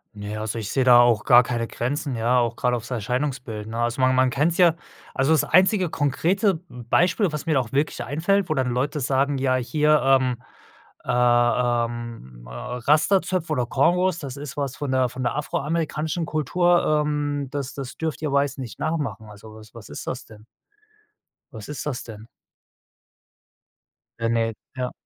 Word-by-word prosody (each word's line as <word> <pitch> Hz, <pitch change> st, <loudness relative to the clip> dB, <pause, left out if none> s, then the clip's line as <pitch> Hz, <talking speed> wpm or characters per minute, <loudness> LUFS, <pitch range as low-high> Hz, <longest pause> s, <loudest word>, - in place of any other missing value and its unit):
Naja, 105 Hz, +1 st, -6 dB
also, 110 Hz, +1 st, -3 dB
ich 105 Hz, -, -5 dB
sehe 135 Hz, -, +1 dB
da 120 Hz, -1 st, +7 dB
auch 120 Hz, -3 st, +3 dB
gar 120 Hz, 0 st, +8 dB
keine 120 Hz, -1 st, -2 dB
Grenzen, 135 Hz, +3 st, -3 dB
ja, 120 Hz, +3 st, +1 dB
auch 120 Hz, -1 st, +1 dB
gerade 125 Hz, 0 st, 0 dB
aufs 115 Hz, +2 st, -9 dB
Erscheinungsbild, 125 Hz, -2 st, -3 dB
ne? 115 Hz, +1 st, -5 dB
Also, 120 Hz, +3 st, -1 dB
man 130 Hz, 0 st, +3 dB
man 130 Hz, 0 st, +3 dB
kennt's 150 Hz, +6 st, 0 dB
ja, 170 Hz, -2 st, +5 dB, 0.4 s
also, 135 Hz, +3 st, +2 dB
das 160 Hz, -, +4 dB
einzige 185 Hz, -1 st, +3 dB
konkrete 170 Hz, -, +1 dB
m 120 Hz, -1 st, -11 dB
Beispiel, 180 Hz, -, +2 dB
was 150 Hz, 0 st, -5 dB
mir 160 Hz, -, +2 dB
da 135 Hz, -, +3 dB
auch 115 Hz, -3 st, -9 dB
wirklich 145 Hz, +3 st, -1 dB
einfällt, 175 Hz, +7 st, 0 dB
wo 155 Hz, -, 0 dB
dann 130 Hz, -3 st, 0 dB
Leute 140 Hz, +5 st, -1 dB
sagen: 135 Hz, +1 st, 0 dB
„Ja, 130 Hz, -1 st, +1 dB
hier, 150 Hz, +4 st, +2 dB
ähm, 130 Hz, -2 st, +3 dB, 0.7 s
äh, -, -, -14 dB
ähm, 120 Hz, -, 0 dB
äh, -, -, -11 dB
Rastazöpfe 150 Hz, -, 0 dB
oder 125 Hz, -4 st, -1 dB
Kongos, 175 Hz, +7 st, +2 dB
das 140 Hz, -6 st, -7 dB
ist 145 Hz, -1 st, -8 dB
was 140 Hz, -2 st, -2 dB
von 145 Hz, -, -4 dB
der 130 Hz, -1 st, +2 dB
von 130 Hz, -, -7 dB
der 125 Hz, +1 st, -1 dB
afroamerikanischen 155 Hz, +2 st, -2 dB
Kultur, 155 Hz, +1 st, +2 dB
ähm, 145 Hz, -1 st, -2 dB
das 140 Hz, -2 st, -4 dB
das 135 Hz, -2 st, -7 dB
dürft 160 Hz, -2 st, -3 dB
ihr 150 Hz, -, -1 dB
Weißen 140 Hz, -1 st, 0 dB
nicht 125 Hz, -3 st, -7 dB
nachmachen.“ 145 Hz, -8 st, -3 dB
Also, 105 Hz, +1 st, -13 dB
was 110 Hz, 0 st, -15 dB
was 115 Hz, -3 st, -11 dB
ist -, -, -8 dB
das 130 Hz, 0 st, -4 dB
denn? 110 Hz, -1 st, -16 dB, 1.1 s
Was 110 Hz, -3 st, -9 dB
ist 150 Hz, -3 st, -5 dB
das 130 Hz, -5 st, -3 dB
denn? 110 Hz, -1 st, -11 dB, 1.9 s
Ja, 115 Hz, 0 st, 0 dB
ne, 115 Hz, -1 st, 0 dB, 0.2 s
ja. 125 Hz, -1 st, -3 dB
130 Hz, 180 wpm, -23 LUFS, 120-150 Hz, 1.9 s, gar